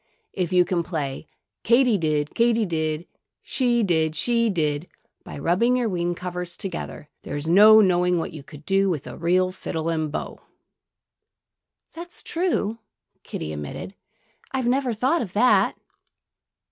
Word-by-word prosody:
"If 180 Hz, -3 st, -2 dB
you 180 Hz, -1 st, +4 dB
can 175 Hz, -1 st, 0 dB
play 155 Hz, -4 st, -4 dB, 0.3 s
Katy 235 Hz, -2 st, +3 dB
did, 150 Hz, -2 st, -1 dB
Katy 230 Hz, -1 st, +2 dB
did; 160 Hz, -2 st, -2 dB, 0.4 s
she 240 Hz, -3 st, +1 dB
did, 160 Hz, -4 st, +1 dB
she 235 Hz, +5 st, +1 dB
did, 155 Hz, -3 st, -1 dB, 0.4 s
by -, -, -9 dB
rubbing 190 Hz, -, +2 dB
your 240 Hz, -3 st, 0 dB
wing 175 Hz, -2 st, -1 dB
covers 180 Hz, 0 st, -5 dB
together, 180 Hz, -5 st, -5 dB
there's 145 Hz, +1 st, -5 dB
no 210 Hz, +5 st, +8 dB
knowing 180 Hz, -2 st, +3 dB
what 165 Hz, -, -3 dB
you 155 Hz, -, -8 dB
could 145 Hz, +2 st, -14 dB
do 195 Hz, 0 st, +2 dB
with 155 Hz, -6 st, -2 dB
a -, -, -8 dB
real 185 Hz, +2 st, +1 dB
fiddle 165 Hz, -3 st, -4 dB
and 155 Hz, -2 st, -1 dB
bow." -, -, -5 dB, 1.5 s
"That's 345 Hz, +1 st, -9 dB
true," 325 Hz, -, -1 dB, 0.4 s
Kiddie 75 Hz, -, -6 dB
admitted. 75 Hz, -, -6 dB, 0.6 s
"I 265 Hz, -, -1 dB
never 255 Hz, +1 st, +1 dB
thought 260 Hz, +9 st, +1 dB
of 190 Hz, -6 st, -5 dB
that." 245 Hz, +5 st, +3 dB
180 Hz, 145 wpm, -24 LUFS, 160-230 Hz, 1.5 s, no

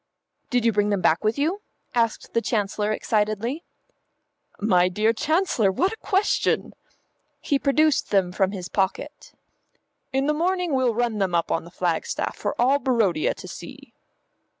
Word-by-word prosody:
"Did 245 Hz, -2 st, +1 dB
you 230 Hz, -, +5 dB
bring 205 Hz, 0 st, +1 dB
them 200 Hz, -2 st, 0 dB
back 165 Hz, +3 st, +2 dB
with 215 Hz, +4 st, +1 dB
you?" 335 Hz, +8 st, 0 dB, 0.3 s
asked 230 Hz, -2 st, -1 dB
the 230 Hz, -, +2 dB
Chancellor 210 Hz, -2 st, -1 dB
excitedly. 215 Hz, -, -1 dB, 1.0 s
"My 180 Hz, -3 st, +3 dB
dear 215 Hz, +5 st, +1 dB
Chancellor, 310 Hz, -, +1 dB
what 370 Hz, -, 0 dB
a -, -, -8 dB
question!" 400 Hz, 0 st, 0 dB, 0.7 s
He 280 Hz, -, 0 dB
produced 300 Hz, +1 st, +2 dB
them 190 Hz, -3 st, +2 dB
from 190 Hz, 0 st, +1 dB
his 185 Hz, -3 st, -6 dB
pocket. 190 Hz, -1 st, -3 dB, 0.8 s
"In 270 Hz, +1 st, 0 dB
the 300 Hz, -, +2 dB
morning 355 Hz, +1 st, 0 dB
we'll 255 Hz, -4 st, +2 dB
run 235 Hz, -2 st, 0 dB
them 185 Hz, -3 st, 0 dB
up 170 Hz, -, 0 dB
on 165 Hz, -, -1 dB
the -, -, -11 dB
flagstaff 175 Hz, -2 st, -2 dB
for -, -, -4 dB
all 265 Hz, +4 st, +4 dB
Barodia 230 Hz, -, +1 dB
to -, -, -10 dB
see." -, -, -10 dB
225 Hz, 155 wpm, -24 LUFS, 195-280 Hz, 1.0 s, you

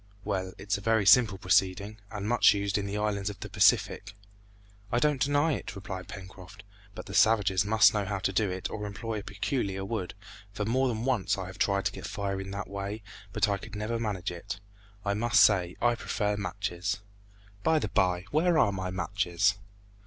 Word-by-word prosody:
"Well, 95 Hz, -2 st, -2 dB
it's 100 Hz, +1 st, -2 dB
a -, -, -12 dB
very 110 Hz, -1 st, +2 dB
simple 110 Hz, -3 st, +6 dB
proceeding, 95 Hz, +3 st, +1 dB
and 105 Hz, -1 st, -5 dB
much 120 Hz, -2 st, +5 dB
used 100 Hz, 0 st, 0 dB
in 100 Hz, -, -3 dB
the 100 Hz, +1 st, -3 dB
islands 105 Hz, -1 st, -1 dB
of 100 Hz, -, -8 dB
the -, -, -6 dB
Pacific." -, -, +2 dB, 0.8 s
"I 120 Hz, -, +1 dB
don't 145 Hz, +1 st, +2 dB
deny 145 Hz, +3 st, +2 dB
it," 110 Hz, -, -5 dB
replied 95 Hz, -2 st, -7 dB
Pencroft, 95 Hz, +2 st, -11 dB, 0.3 s
"but -, -, -7 dB
the 100 Hz, -, -9 dB
savages 105 Hz, -3 st, +4 dB
must 110 Hz, +1 st, +5 dB
know 105 Hz, -2 st, 0 dB
how 100 Hz, 0 st, -2 dB
to 95 Hz, 0 st, -1 dB
do 105 Hz, 0 st, +1 dB
it 95 Hz, 0 st, -3 dB
or 105 Hz, -1 st, -4 dB
employ 110 Hz, +1 st, -4 dB
a -, -, -9 dB
peculiar 100 Hz, -3 st, -2 dB
wood, 95 Hz, -4 st, -4 dB, 0.4 s
for 105 Hz, 0 st, -3 dB
more 130 Hz, +4 st, +2 dB
than 115 Hz, -1 st, -2 dB
once 125 Hz, -9 st, +1 dB
I 95 Hz, -, -4 dB
have 95 Hz, +1 st, -10 dB
tried 100 Hz, -1 st, +1 dB
to -, -, +1 dB
get -, -, -7 dB
fire 100 Hz, -1 st, -3 dB
in 95 Hz, -, -7 dB
that 100 Hz, 0 st, -5 dB
way, 100 Hz, +2 st, -5 dB, 0.3 s
but 105 Hz, 0 st, +2 dB
I 100 Hz, -1 st, 0 dB
could 105 Hz, -, -10 dB
never 110 Hz, +2 st, -2 dB
manage 100 Hz, -6 st, -2 dB
it. 100 Hz, +4 st, -6 dB, 0.5 s
I 100 Hz, -, +1 dB
must 120 Hz, +3 st, +4 dB
say 90 Hz, -4 st, +3 dB
I 120 Hz, 0 st, +4 dB
prefer 105 Hz, -2 st, -1 dB
matches. 100 Hz, 0 st, -3 dB, 0.6 s
By 160 Hz, +5 st, +3 dB
the 105 Hz, -, -1 dB
bye, 90 Hz, -1 st, +1 dB
where 165 Hz, +3 st, +3 dB
are 100 Hz, -, +4 dB
my 95 Hz, -1 st, -3 dB
matches?" 95 Hz, +2 st, 0 dB
100 Hz, 200 wpm, -29 LUFS, 95-110 Hz, 0.8 s, simple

